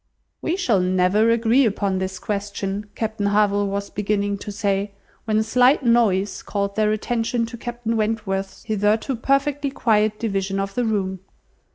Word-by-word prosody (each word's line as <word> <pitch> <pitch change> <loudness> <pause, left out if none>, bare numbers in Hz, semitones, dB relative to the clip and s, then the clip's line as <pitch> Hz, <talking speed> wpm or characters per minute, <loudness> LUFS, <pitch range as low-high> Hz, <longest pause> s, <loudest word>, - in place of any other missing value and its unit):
"We 330 - 0
shall 235 - +2
never 185 +4 +2
agree 230 +3 +3
upon 200 -4 0
this 190 0 -3
question," 200 0 -4
Captain 220 -2 -2
Harville 205 0 +2
was 200 0 -3
beginning 205 -1 -1
to 205 - -6
say, 200 0 -1 0.3
when 215 -1 +1
a 220 - +3
slight 250 +5 +3
noise 220 -5 +2
called 200 -1 -3
their 215 -1 +2
attention 230 +2 -1
to 230 +1 -8
Captain 240 -1 -3
Wentworth's 210 -3 -2
hitherto 215 +4 0
perfectly 275 +3 0
quiet 215 -5 +1
division 195 -3 -1
of 195 0 -3
the 245 -1 0
room. 190 -4 -1
210 Hz, 155 wpm, -22 LUFS, 200-230 Hz, 0.3 s, agree